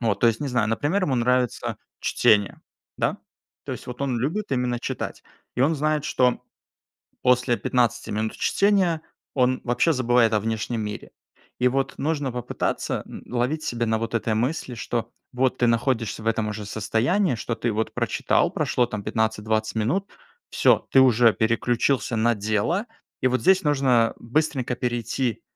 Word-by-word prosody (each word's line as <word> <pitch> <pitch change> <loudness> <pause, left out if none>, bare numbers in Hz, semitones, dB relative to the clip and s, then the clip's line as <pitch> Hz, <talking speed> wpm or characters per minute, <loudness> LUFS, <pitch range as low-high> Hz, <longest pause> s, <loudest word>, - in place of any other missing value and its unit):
Вот, 110 -5 0
то - - +5
есть 115 -1 0
не 145 - -2
знаю, 125 -4 +1
например, 145 - 0
ему 140 - 0
нравится 125 0 0 0.2
чтение, 105 -2 +2 0.4
да? - - 0 0.5
То - - -5
есть - - -8
вот 125 +1 -7
он 130 -4 -1
любит 155 - -2
именно 125 -2 0
читать - - -5 0.3
и - - -1
он 160 +4 +3
знает, 150 0 0
что 125 -4 +2 0.8
после 125 -1 +3
15 120 -2 0
минут 110 +1 -2
чтения 195 -5 +2 0.3
он 130 -1 +2
вообще 125 +7 +2
забывает 120 -4 +3
о 105 - +3
внешнем 110 +2 -2
мире. 105 -1 -6 0.5
И 125 - +5
вот 135 +1 -1
нужно 145 -2 -1
попытаться 125 -1 -2
н - - -10
ловить 125 +6 0
себя 120 -1 -1
на 110 0 +1
вот 115 +1 -4
этой 110 -1 0
мысли, 125 +2 -2
что 115 0 -3 0.2
вот 130 0 +1
ты 120 - +3
находишься 115 -2 0
в - - -10
этом 110 -1 0
уже 105 0 -5
состоянии, 115 - +1
что 115 - -3
ты 120 -1 -1
вот 110 +1 -2
прочитал, - - +1
прошло 125 - +1
там 110 -3 -5
15-20 110 0 -1
минут, 140 - 0 0.4
всё - - +3
ты 135 - +7
уже 120 -3 +5
переключился 120 +3 +1
на 115 +2 +3
дело, 110 - 0 0.4
и - - +3
вот 130 0 0
здесь 190 +1 +4
нужно 130 -6 +3
быстренько 130 -1 -1
перейти, 120 0 -2
120 Hz, 165 wpm, -24 LUFS, 110-135 Hz, 0.8 s, ты